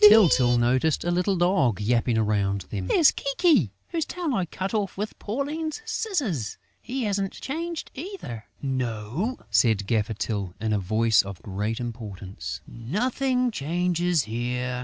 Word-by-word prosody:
Tyltyl 175 - +7
noticed 130 +6 +2
a 175 - 0
little 180 +3 +2
dog 175 - +2
yapping 115 +2 +2
around 100 -2 +1
them: 95 -3 -3
"There's 300 - +6
Kiki, 275 - +2 0.2
whose 330 -2 0
tail 340 -3 -3
I 185 -6 0
cut 190 +5 -4
off 205 -4 -1
with 210 +2 -4
Pauline's 300 - -3
scissors.... 280 - -1 0.2
He 260 +1 -3
hasn't 200 -2 -1
changed 330 +4 -4
either...." 270 - -7 0.2
"No," 130 - -2
said 110 -4 +3
Gaffer 110 0 0
Tyl, 100 -4 -3
in 110 0 0
a 105 - +2
voice 110 +3 +3
of 100 -2 -8
great 105 +3 -2
importance, 105 -5 -6
"nothing 250 - 0
changes 175 - +1
here!" 125 +3 -2
140 Hz, 140 wpm, -26 LUFS, -, 0.2 s, Tyltyl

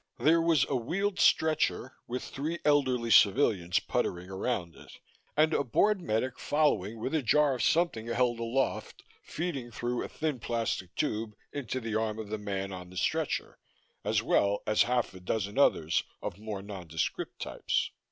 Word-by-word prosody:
There 155 +7 +4
was 165 -5 +3
a 140 - -1
wheeled 185 - -1
stretcher, 155 -4 +2
with 125 +2 -3
three 155 +5 -4
elderly 130 -5 +2
civilians 100 -7 +4
puttering 90 +1 -2
around 95 -3 -2
it, - - -14 0.4
and 155 +1 +4
a - - +2
bored 195 - +2
medic 125 -2 -1
following 140 -9 +1
with 130 +6 -3
a 160 - +2
jar 145 +4 +3
of 125 - -3
something 155 -5 +1
held 120 0 +1
aloft, 120 +4 -2 0.2
feeding 150 -7 -4
through 120 +2 -2
a - - -4
thin 155 -5 -2
plastic 115 -6 -2
tube 110 -6 -2 0.2
into 130 -2 -3
the 115 -3 -4
arm 110 0 0
of 110 -2 -6
the 110 0 -3
man 100 -1 -3
on 90 -1 -8
the 90 - -11
stretcher, - - -1 0.4
as - - +1
well 100 0 +2
as 105 - +3
half 120 -3 +1
a 95 - -10
dozen 100 +5 -2
others 80 - +3 0.2
of - - -6
more 105 -2 -5
nondescript 90 -6 -4
types. - - -1
120 Hz, 165 wpm, -30 LUFS, 105-145 Hz, 0.4 s, There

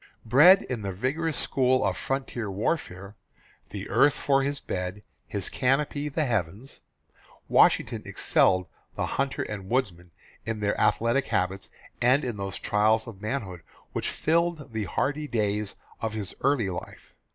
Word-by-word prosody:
Bred 150 - +7
in 125 -4 -4
the 100 -1 -3
vigorous 140 - -1
school 130 -2 +2
of 95 -2 +1
frontier 130 -2 -3
warfare, 100 - -3 0.5
"the - - -6
earth 145 0 +4
for 135 -1 +2
his 140 +1 -1
bed, 90 +3 -4 0.2
his 100 -3 -2
canopy 145 +3 0
the 150 +2 0
heavens," 110 +1 -3 0.7
Washington - - +4
excelled 95 0 +2 0.3
the - - -1
hunter 135 0 -1
and 100 -2 -6
woodsman 90 -9 -1 0.3
in 115 0 -3
their 100 -1 0
athletic 115 +5 +2
habits 95 +1 -1 0.3
and 130 +4 +4
in 120 -4 -3
those 100 -1 -4
trials 110 +2 +2
of 105 -4 -10
manhood 105 -6 -4 0.3
which - - -1
filled 165 -4 0
the 110 -2 -2
hardy 145 - -1
days 105 -4 -1 0.3
of 110 -1 -2
his 105 -4 -4
early 130 -8 +2
life. 85 - -9
115 Hz, 145 wpm, -27 LUFS, 100-135 Hz, 0.7 s, Bred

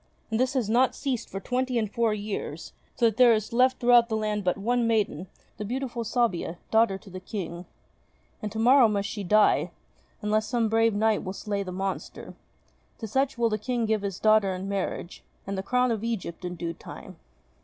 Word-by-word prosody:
And 220 - 0
this 255 +2 +1
has 250 -5 +1
not 245 +4 +3
ceased 255 -5 -3
for 195 - -5
twenty 255 +3 -1
and 220 -2 +1
four 230 +2 0
years, 205 -6 -5 0.2
so 235 - +2
that 225 -2 +2
there 245 -2 +7
is 215 +2 -4
left 255 +2 +4
throughout 240 -1 +5
the 220 - 0
land 210 -1 -1
but 180 -1 +1
one 235 +3 +1
maiden, 205 -6 0 0.3
the - - -4
beautiful 245 +2 -3
Sabia, 220 -7 -1
daughter 220 -3 +3
to 195 -1 -15
the 185 - -6
King. 180 -3 -6 0.7
And 210 - -4
to 220 - -6
morrow 245 +2 +6
must 200 -2 -1
she 205 0 -5
die, 210 +3 +3 0.5
unless 215 +1 +1
some 230 -1 +1
brave 225 -1 +3
knight 220 0 +2
will 185 - -4
slay 200 0 -3
the 185 -2 -5
monster. 190 +1 -5 0.6
To 225 - -6
such 265 +4 0
will 235 -1 +2
the 215 0 -1
King 240 +1 -1
give 220 -1 0
his 195 -2 -4
daughter 215 -3 +3
in 185 +1 -5
marriage, 195 -2 -4 0.2
and 195 - -3
the 190 - -2
crown 250 +4 +1
of 220 -2 -2
Egypt 210 -7 -4
in 180 0 -4
due 170 0 -4
time." - - -11
215 Hz, 205 wpm, -27 LUFS, 195-235 Hz, 0.7 s, there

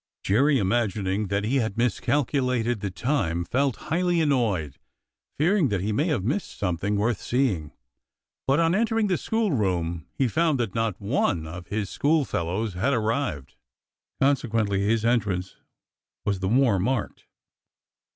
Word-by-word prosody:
Jerry, 135 +8 +3
imagining 100 -2 0
that 100 +1 -1
he 125 +6 +1
had 110 -4 -1
miscalculated 125 -1 0
the 100 - -3
time, 90 - -1
felt 135 +6 +1 0.2
highly 175 +1 +2
annoyed, 110 - 0 0.6
fearing 175 +2 +3
that 100 -4 -1
he 105 +3 -1
may 145 - +1
have 140 - 0
missed 145 - -2
something 100 +2 -1
worth 105 +2 0
seeing; 110 - 0 0.8
but 135 +3 +3
on 165 0 +3
entering 225 +1 +1
the 190 -3 +1
school 225 -3 0
room 85 - -1
he 135 - +2
found 155 +3 +1
that 115 -5 -1
not 115 -4 -1
one 100 - 0
of 85 +2 -8
his 105 -1 -2
schoolfellows 110 - 0
had 115 +11 0
ar 115 - +1
rived; 110 - -2 0.7
consequently 115 -7 +1
his 110 +2 +1
entrance 100 -6 0 0.7
was 100 -2 0
the 95 0 -1
more 120 -4 +3
marked. 120 +4 -2
115 Hz, 145 wpm, -25 LUFS, 95-140 Hz, 0.8 s, Jerry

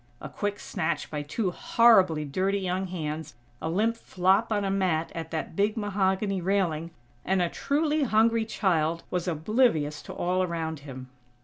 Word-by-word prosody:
A - - -7
quick 205 0 -3
snatch 160 +1 -3
by 150 -1 -2
two 180 +7 -2
horribly 185 -8 +4
dirty 190 +7 0
young 190 0 -2
hands, 155 -6 -5 0.3
a 160 - -2
limp 215 +7 +1
flop 195 +1 +1
on 205 -2 +1
a 195 - 0
mat 180 -5 0
at 165 -1 -5
that 160 0 -4
big 205 +4 +1
mahogany 195 -1 0
railing, 170 -4 0 0.3
and 190 +1 +1
a 175 -1 +1
truly 300 - 0
hungry 225 -2 +3
child 170 -6 0
was 180 0 -2
oblivious 160 - +1
to - - -10
all 180 +1 0
around 165 -3 -2
him. 130 -2 -9
185 Hz, 165 wpm, -27 LUFS, 160-205 Hz, 0.3 s, horribly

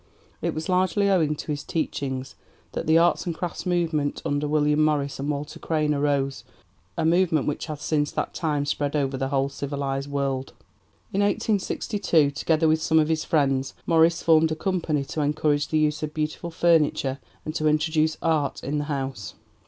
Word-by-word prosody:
It - - -1
was 155 +1 -4
largely 185 +2 +2
owing 160 -5 +2
to 150 - -5
his 145 -1 -3
teachings 135 -4 -3 0.4
that - - -4
the 160 +1 +5
'Arts 175 +2 +3
and 170 - -2
Crafts' 175 +2 -5
movement 165 -5 0
under 145 +1 0
William 150 0 +2
Morris 145 -3 0
and 140 +2 -3
Walter 145 0 -4
Crane 155 -2 0
arose 140 -1 0 0.5
a - - 0
movement 165 -2 +3
which 150 - -3
has 150 -2 -6
since 145 -2 0
that - - -2
time 150 -4 -1
spread 145 0 -1
over 135 -2 0
the 135 0 -1
whole 135 0 +1
civilized 140 0 -3
world. 135 -2 -2 0.6
In 200 - +1
1862, 200 -6 +1
together 155 +2 +1
with 155 0 +2
some 160 0 +2
of 155 0 +3
his 160 -1 0
friends, 135 -3 +1
Morris 165 0 +3
formed 160 -1 +4
a - - 0
company 160 -5 -1
to 155 - -3
encourage 145 0 +1
the 155 - 0
use 150 0 +1
of 155 -1 -4
beautiful 155 +2 -3
furniture 155 -5 +2 0.3
and 155 - -4
to 155 -1 0
introduce 155 +1 +2
'Art 155 -4 0
in 145 +3 -1
the 145 - -2
House.' 135 -7 -4
150 Hz, 180 wpm, -25 LUFS, 145-160 Hz, 0.6 s, the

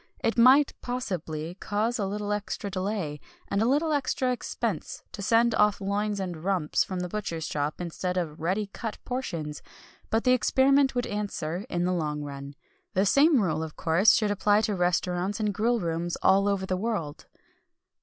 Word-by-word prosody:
It 230 - +1
might, 260 +5 +6
possibly, 175 -10 -4
cause 210 +5 -1
a 200 - 0
little 205 +1 -3
extra 205 -1 -4
delay, 185 -6 -3 0.3
and 200 - +1
a 225 - +3
little 300 +5 +2
extra 260 -2 0
expense, 250 - -3
to 200 - -7
send 230 +3 +3
off 210 -1 +3
loins 205 +1 -1
and 175 -4 -5
rumps 185 -5 +1
from 185 -2 -4
the 180 - -2
butcher's 170 -5 -4
shop, 145 +1 -2
instead 180 +1 -3
of 160 -3 -3
ready 190 +6 0
cut 225 -3 -5
portions, 165 - -4 0.5
but 225 +1 +1
the 255 - +4
experiment 265 +3 +3
would 245 - 0
answer, 200 -2 -3
in 175 -1 -1
the 180 - +1
long 150 -4 -2
run. 140 0 -7 0.4
The 190 +2 +3
same 280 - +5
rule, 160 -4 0
of 160 -1 -6
course, 180 +6 +4
should 210 -2 +1
apply 205 +1 +3
to 215 -1 0
restaurants 180 +2 0
and 210 -2 0
grill 230 +4 +1
rooms 170 -1 -2
all 195 +1 +5
over 200 -2 0
the 185 - -1
world. 190 -8 -3
200 Hz, 175 wpm, -27 LUFS, 170-225 Hz, 0.5 s, might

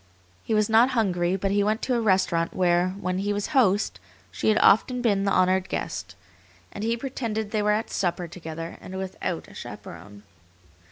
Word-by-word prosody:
He 220 - -1
was 215 -1 +3
not 225 +3 +5
hungry, 180 -4 +1
but 195 0 -1
he 205 0 +2
went 215 +2 0
to 255 - 0
a 235 - +1
restaurant 185 -5 +1
where, 180 0 +2
when 185 -1 -2
he 205 +1 -1
was 205 0 -2
host, 205 - +2 0.3
she 95 - 0
had 215 - +4
often 250 +5 +4
been 205 -5 +1
the 195 - +1
honored 185 0 +2
guest, 90 +1 -4 0.6
and 205 - -6
he 230 +1 0
pretended 230 -5 -3
they 215 - 0
were 210 - +1
at 210 +2 0
supper 175 -1 -1
together 165 -1 -7
and 190 - -8
without 190 -1 -4
a - - -15
chaperon. 105 0 -10
195 Hz, 185 wpm, -25 LUFS, 180-220 Hz, 0.6 s, not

